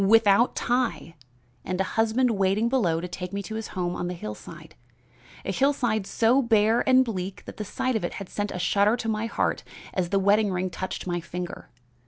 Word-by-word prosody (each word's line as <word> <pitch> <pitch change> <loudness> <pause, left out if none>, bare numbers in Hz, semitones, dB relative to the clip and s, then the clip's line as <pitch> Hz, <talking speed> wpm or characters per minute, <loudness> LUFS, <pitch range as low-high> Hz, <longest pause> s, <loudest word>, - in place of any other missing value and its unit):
Without 225 +2 +5
tie! 245 -8 -1 0.5
and 185 0 -3
a - - +3
husband 225 +3 +2
waiting 200 +2 +1
below 185 -11 +2
to 180 - -4
take 180 0 -6
me 200 0 -3
to 220 - -7
his 220 0 -4
home 175 -1 -1
on 175 - -3
the 180 - -4
hillside 105 -10 -9 0.7
a - - -1
hillside 240 -4 +1
so 240 +4 +3
bare 225 -1 +3
and 260 0 +6
bleak 190 -4 -5
that - - -9
the 215 - -3
sight 255 +5 -2
of 220 - -1
it 175 - -2
had 195 - -7
sent 205 +2 -3
a - - -5
shudder 200 +5 +3
to 225 - -4
my 220 0 -1
heart - - -1 0.3
as 180 -2 -1
the 200 - +2
wedding 200 +1 +3
ring 185 0 -2
touched 185 +2 -5
my 175 -1 -1
finger. 180 +1 -6
205 Hz, 205 wpm, -26 LUFS, 185-225 Hz, 0.7 s, and